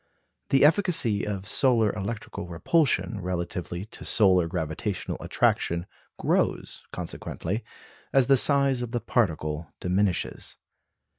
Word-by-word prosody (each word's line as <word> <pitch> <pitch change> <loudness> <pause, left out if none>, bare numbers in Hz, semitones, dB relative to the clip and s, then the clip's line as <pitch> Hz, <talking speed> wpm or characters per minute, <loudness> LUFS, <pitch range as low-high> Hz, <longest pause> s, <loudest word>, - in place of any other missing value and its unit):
The 135 +1 +5
efficacy 155 - +2
of 100 -2 -4
solar 115 -6 +3
electrical 105 -2 -5
repulsion 110 - +1
relatively 90 0 -4
to 110 - -10
solar 95 -5 +3
gravitational 85 +3 -3
attraction 85 +1 0 0.3
grows, - - 0
consequently, 100 +8 -4 0.5
as 135 -2 +4
the 135 - +5
size 140 -1 +3
of 120 0 -5
the 120 - +1
particle 80 - -1
diminishes. 95 +1 -1
105 Hz, 105 wpm, -26 LUFS, 90-125 Hz, 0.5 s, The